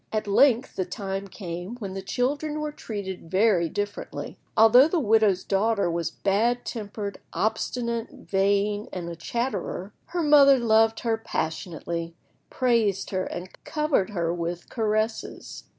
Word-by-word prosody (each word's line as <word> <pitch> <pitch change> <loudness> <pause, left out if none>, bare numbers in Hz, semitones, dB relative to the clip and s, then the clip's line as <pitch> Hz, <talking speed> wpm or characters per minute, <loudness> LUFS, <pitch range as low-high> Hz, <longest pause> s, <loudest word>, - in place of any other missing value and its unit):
At 215 0 -1
length 240 +4 +3
the 185 - +1
time 195 +1 -4
came 180 +2 -6
when 200 -6 -6
the 195 - -4
children 290 +9 -1
were 300 0 -3
treated 195 - -6
very 190 -3 +3
differently. 205 +2 -4 0.2
Although 240 +5 +8
the 335 +1 0
widow's 215 - +3
daughter 200 -2 +1
was 170 -1 -1
bad 230 +5 0
tempered, 205 -3 -5
obstinate, 235 +1 -1
vain, 200 +2 0
and 175 -2 -5
a 170 - -6
chatterer, 210 0 -3
her 345 -1 -2
mother 285 -2 +7
loved 225 -1 +3
her 225 -2 +1
passionately, 170 -3 -4 0.3
praised 230 -6 +1
her, 185 -1 -1
and 180 +1 -6
covered 300 -10 0
her 170 -5 -1
with 175 0 -4
caresses. 220 -1 -2
210 Hz, 135 wpm, -26 LUFS, 190-235 Hz, 0.3 s, Although